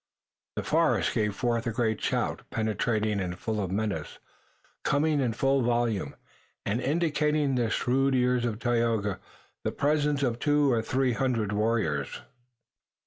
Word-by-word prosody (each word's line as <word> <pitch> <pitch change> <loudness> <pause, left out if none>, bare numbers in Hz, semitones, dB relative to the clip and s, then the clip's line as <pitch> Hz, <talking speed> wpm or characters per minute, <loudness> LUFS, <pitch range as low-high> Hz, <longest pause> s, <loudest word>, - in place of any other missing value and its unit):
The - - -2
forest - - +2
gave 105 -2 0
forth 120 0 0
a - - 0
great 110 -2 0
shout, - - -1
penetrating 110 -1 0
and 90 -2 -3
full 110 +2 -2
of 95 - -2
menace, 105 +2 -2 0.7
coming 150 +1 +2
in 125 -4 +1
full 135 +3 +2
volume, 120 - 0 0.5
and 110 +5 0
indicating 150 -2 +1
to 125 - +1
the - - -1
shrewd 135 +4 +1
ears 125 -1 +2
of 115 -3 -1
Tayoga 115 -4 0 0.4
the - - -1
presence 145 -1 +1
of 120 -2 0
two 145 -1 +3
or 115 -2 +2
three 130 +2 +1
hundred 115 -4 0
warriors. 105 -10 0
120 Hz, 145 wpm, -28 LUFS, 110-135 Hz, 0.7 s, two